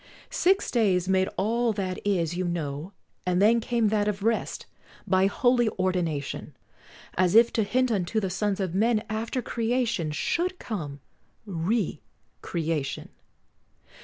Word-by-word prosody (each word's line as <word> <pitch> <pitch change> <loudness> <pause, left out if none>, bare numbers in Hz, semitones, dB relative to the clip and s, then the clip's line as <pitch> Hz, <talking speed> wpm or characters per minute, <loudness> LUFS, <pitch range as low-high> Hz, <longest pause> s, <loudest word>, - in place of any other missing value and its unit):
Six 390 -5 +2
days 190 -7 +2
made 190 0 +2
all 230 +3 +1
that 185 -3 -3
is, 175 -5 0
you 185 - -1
know, 160 -1 -3 0.3
and 180 0 +1
then 220 +4 +5
Came 230 -1 +1
that 210 -1 +1
of 200 -1 -2
rest 230 +1 -1 0.4
by 190 -1 +3
holy 240 +2 +3
ordination, 175 -6 -2 0.6
As 185 +1 +2
if 230 +1 +6
to 225 - +2
hint 245 +4 +1
unto 205 +1 0
the 190 -3 -2
sons 200 +1 -1
of 185 -4 -2
men, 220 +2 +2
After 230 +4 -2
creation 230 -7 0
should 350 - -1
come 150 - -5 0.4
re 195 +2 -1 0.4
creation. 160 -4 -2
200 Hz, 135 wpm, -27 LUFS, 180-230 Hz, 0.6 s, if